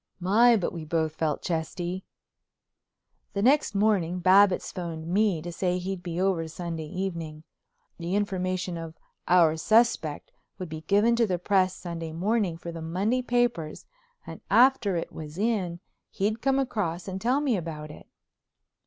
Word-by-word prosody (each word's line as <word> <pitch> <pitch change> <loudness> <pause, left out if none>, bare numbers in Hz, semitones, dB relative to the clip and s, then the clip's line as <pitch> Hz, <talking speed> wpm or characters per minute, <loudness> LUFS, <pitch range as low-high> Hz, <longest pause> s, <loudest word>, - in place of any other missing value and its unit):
My, 225 +6 +5
but 190 - -2
we 165 -2 -6
both 160 0 -1
felt 155 -2 -2
chesty! 175 +2 -3 1.3
The 200 - -1
next 265 -3 +3
morning 195 -4 +2
Babbitts 185 +1 +4
phoned 170 -4 -5
me 185 -2 +1
to 175 - -5
say 180 +1 -1
he'd 185 0 -4
be 175 -1 -4
over 185 -4 +1
Sunday 165 -1 -5
evening. 165 -4 -5 0.6
The 170 +3 -2
information 185 -3 -1
of 165 0 -8 0.3
"Our 170 -3 +5
Suspect" 215 -5 +2 0.3
would 180 -3 -6
be 155 0 -6
given 205 +7 +3
to 230 -1 +3
the 180 -2 0
press 185 0 +2
Sunday 165 -2 -6
morning 190 0 0
for 170 0 -7
the 165 -1 -7
Monday 195 +10 0
papers 240 -11 -1 0.4
and - - -9
after 240 -6 +4
it 165 - -3
was 155 0 -9
in 195 -5 -1 0.3
he'd 215 +3 -1
come 270 0 +2
across 200 -10 -2
and 190 0 -5
tell 250 +4 +2
me 280 -5 +1
about 155 -4 -5
it. - - -13
180 Hz, 155 wpm, -27 LUFS, 165-205 Hz, 1.3 s, My